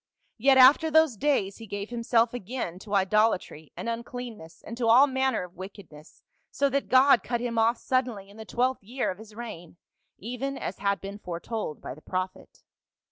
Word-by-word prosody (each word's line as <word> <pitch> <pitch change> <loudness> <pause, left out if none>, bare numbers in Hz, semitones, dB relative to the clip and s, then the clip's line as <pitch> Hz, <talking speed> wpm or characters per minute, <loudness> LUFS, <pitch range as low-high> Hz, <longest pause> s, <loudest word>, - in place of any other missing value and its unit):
Yet 265 +3 +5
after 275 +5 +7
those 315 -4 +4
days 210 -6 0
he 225 - -10
gave 200 +2 -5
himself 235 0 +1
again 230 -6 -5
to 205 +1 -4
idolatry 195 -6 +1
and - - -5
uncleanness 230 -6 -7
and 230 - -7
to 240 -2 0
all 245 +5 +7
manner 265 -5 0
of 180 -1 -11
wickedness, 185 -5 -12 0.3
so 280 - +1
that 280 +1 -1
God 260 -2 +6
cut 240 +3 -2
him 235 -1 -2
off 230 +2 +3
sud 255 +1 0
denly 200 -5 -8
in 200 +2 -16
the 220 - -7
twelfth 255 +4 -1
year 245 +3 -2
of 185 - -10
his 220 -1 -13
reign, 210 -8 -9 0.4
even 250 +6 -4
as - - -5
had 200 -2 0
been 200 +1 -7
foretold 180 -1 -5
by - - -6
the 150 - -15
prophet." 185 +2 -5
230 Hz, 190 wpm, -27 LUFS, 195-255 Hz, 0.4 s, after